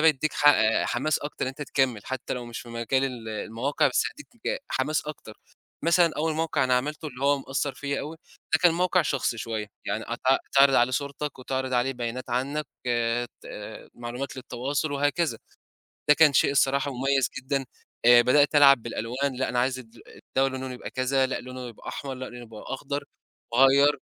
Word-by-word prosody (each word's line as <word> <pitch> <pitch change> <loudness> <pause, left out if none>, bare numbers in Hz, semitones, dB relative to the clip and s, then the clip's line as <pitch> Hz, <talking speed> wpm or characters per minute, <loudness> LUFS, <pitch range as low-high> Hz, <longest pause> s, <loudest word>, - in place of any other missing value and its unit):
بيدّيك 155 -1 +3
ح 145 - +4
آآ 110 -6 +4
حماس 140 +5 0
أكتر 145 - -6
إن - - -2
أنت 135 +3 -6
تكمّل، 135 -5 0
حتّى 130 -1 -4
لو 125 -1 -6
مش 120 -1 -6
في 120 - -12
مجال 115 +3 0
ال 125 -4 -5
المواقع 115 +7 0
بس 125 - +2
هيدّيك 270 -4 -6
حماس 150 +4 0
أكتر، 125 -7 -9 0.4
مثلًا 170 +1 +4
أول 160 +1 0
موقع 160 -3 0
أنا 130 0 +3
عملته 150 +4 -3
اللي 130 -1 -6
هو 140 0 +4
مأثّر 135 +1 -3
فيّا 140 -1 -3
أوي، 155 +2 -7 0.4
ده - - +5
كان 175 -2 +6
موقع 180 +1 +2
شخصي 125 -3 -1
شويّة، 110 -2 -3 0.2
يعني 110 - -2
أت 120 - -4 0.3
تعرض 135 0 +6
عليه 120 0 +4
صورتك 140 +2 -3
وتعرض 130 0 -3
عليه 125 +2 +1
بيانات 120 0 -5
عنك 140 +5 -1 0.8
ت - - -12 0.5
معلومات 120 +3 -6
للتواصل 130 +4 -3
وهكذا، 145 -2 0 0.7
ده 150 - +8
كان 155 -1 +6
شيء 140 - +4
الصراحة 140 0 +2
مميّز 135 0 +1
جدًا، 135 +1 -2 0.4
آآ 120 0 +8
بدأت 145 +5 +4
ألعب 140 -4 +7
بالألوان 125 +4 -3
لأ 130 - -1
أنا 125 - -1
عايز 130 +1 +1
الد 120 -2 -13
الدَوْا 135 0 -1
لونه 130 -1 -5
يبقى 125 - -8
كذا 130 +1 +1
لأ 130 - -3
لونه 125 0 -7
يبقى 115 - -12
أحمر 135 -2 -5
لأ 130 0 -6
لونه 120 0 -10
يبقى 110 -2 -11
أخضر، 140 +2 -4 0.5
أغيّر. 135 +3 +5
135 Hz, 185 wpm, -26 LUFS, 125-145 Hz, 0.8 s, ده